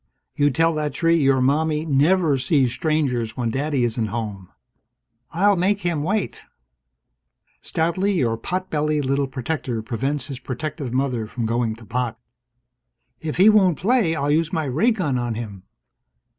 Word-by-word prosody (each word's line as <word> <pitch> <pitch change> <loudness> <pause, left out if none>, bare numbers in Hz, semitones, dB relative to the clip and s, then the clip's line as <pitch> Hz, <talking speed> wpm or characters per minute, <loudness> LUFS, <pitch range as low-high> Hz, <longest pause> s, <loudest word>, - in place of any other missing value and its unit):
"You 145 0 +2
tell 165 +4 +2
that 150 -1 -2
tree 165 0 +3
your 135 -3 +3
Mommie 150 +3 +1
never 155 +2 +3
sees 130 -2 +2
strangers 135 -8 -1
when 120 -2 -1
Daddy 140 0 0
isn't 115 -1 0
home!" 105 -4 -5 0.8
"I'll 200 +4 +3
make 195 +3 +1
him 170 -4 -1
wait!" 195 +5 -2 1.2
Stoutly 185 +5 0
your 120 -11 +1
pot 185 +11 -4
bellied 150 -1 0
little 140 +1 +1
protector 130 -2 -3
prevents 135 +4 -2
his 135 -3 -7
protective 135 +1 -5
mother 125 -4 -1
from 115 +1 -4
going 115 -1 0
to 115 0 -14
pot. 120 0 -3 1.0
"If 155 -1 -4
he 190 +4 +6
won't 195 -7 +5
play, 200 -4 +2
I'll 145 -1 0
use 160 +1 +1
my 160 - -1
ray 150 - +2
gun 165 - 0
on 120 -2 -2
him!" 100 -5 -7
145 Hz, 155 wpm, -22 LUFS, 125-165 Hz, 1.2 s, he